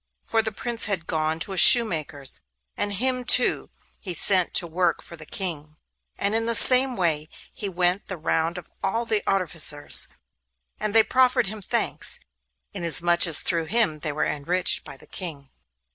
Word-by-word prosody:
For 225 -1 0
the 220 0 -5
Prince 230 +2 -1
had 190 -5 -3
gone 160 -1 -2
to 195 - -2
a - - -7
shoemaker's, 155 - +4 0.3
and 205 0 -2
him 255 +4 -1
too 245 0 +3 0.3
he 180 -4 -4
sent 185 +2 +2
to 175 - +3
work 170 0 -2
for 170 - -11
the 155 -2 -13
King; 155 -6 -6 0.4
and 200 +1 -2
in 225 +1 -1
the 235 - -1
same 255 +2 +5
way 160 -5 -2 0.2
he 200 - -6
went 180 +1 -2
the 190 - -7
round 165 +2 -2
of 180 - -11
all 225 +5 -2
the 215 -2 -1
artificers, 165 -6 +2 0.7
and 215 0 -4
they 225 - +7
all 220 - -18
proffered 255 -1 +2
him 215 +1 -8
thanks, - - -1 0.5
inasmuch 170 +2 +2
as 160 - +8
through 165 -2 -2
him 205 -5 0
they 150 0 -4
were 150 - -3
enriched 175 +5 +1
by 135 - -12
the - - -17
King. 145 -7 -7
180 Hz, 175 wpm, -23 LUFS, 160-220 Hz, 0.7 s, as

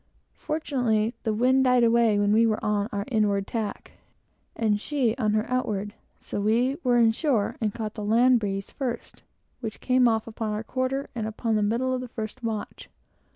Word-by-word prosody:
Fortunately, 245 -8 0
the 220 - -1
wind 255 +5 +3
died 250 -1 +4
away 230 -2 +4
when 205 0 +2
we 230 +1 +5
were 215 -1 +1
on 210 0 0
our 200 0 -3
inward 205 -3 +1
tack, 215 -3 -4 0.6
and 210 -2 +1
she 255 -6 0
on 215 -4 +1
her 215 +1 0
outward, 210 -5 -2 0.3
so 205 - -4
we 240 +6 +2
were 245 -2 +3
in 230 -1 +5
shore, 235 -4 0
and 215 -2 +1
caught 215 0 -5
the 210 - -6
land 240 +4 +4
breeze 195 -2 -4
first, 245 -3 -5 0.4
which 225 -4 -6
came 255 -1 +3
off 225 -1 +1
upon 220 -1 -4
our 210 +1 -3
quarter, 260 +3 -2
about 220 -2 -4 0.2
the 215 - +2
middle 235 +5 0
of 255 - -2
the 255 - -6
first 225 +2 -6
watch. 220 -2 -5
225 Hz, 185 wpm, -26 LUFS, 210-250 Hz, 0.6 s, we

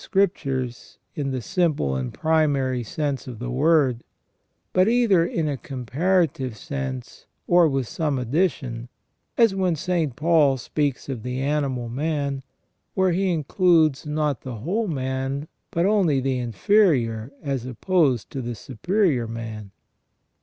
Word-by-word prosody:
Scriptures 135 - -1 0.2
in 140 -2 -2
the 130 -3 -3
simple 150 - 0
and 65 -2 -3
primary 145 -5 +1
sense 140 +4 -3
of 125 -3 -7
the 125 +2 -5
word, 135 -3 +3 0.7
but 185 +1 +4
either 225 -7 +4
in 165 -2 -1
a 145 -2 -1
comparative 135 - -1
sense 130 +1 -6 0.2
or 175 -2 +5
with 135 -3 -1
some 150 0 -1
addition; 125 -3 -1 0.5
as 230 -4 +5
when 185 -3 +1
St. 165 -5 -1
Paul 150 -3 +3
speaks 140 +1 -2
of 130 -5 -4
the 125 +2 -4
animal 135 -3 -1
man, 140 +1 -2 0.5
where 190 -1 +3
he 185 +2 +1
includes 160 -2 +3
not 150 -3 -1
the 130 -3 -6
whole 185 - -1
man, 135 -1 -2 0.2
but 170 +1 0
only 190 -9 +3
the 130 -1 -1
inferior 125 - +2
as 135 -4 -2
opposed 130 - +1
to 135 - -4
the 120 -1 -4
superior 135 - 0
man. 110 -2 -6
140 Hz, 135 wpm, -24 LUFS, 125-170 Hz, 0.7 s, or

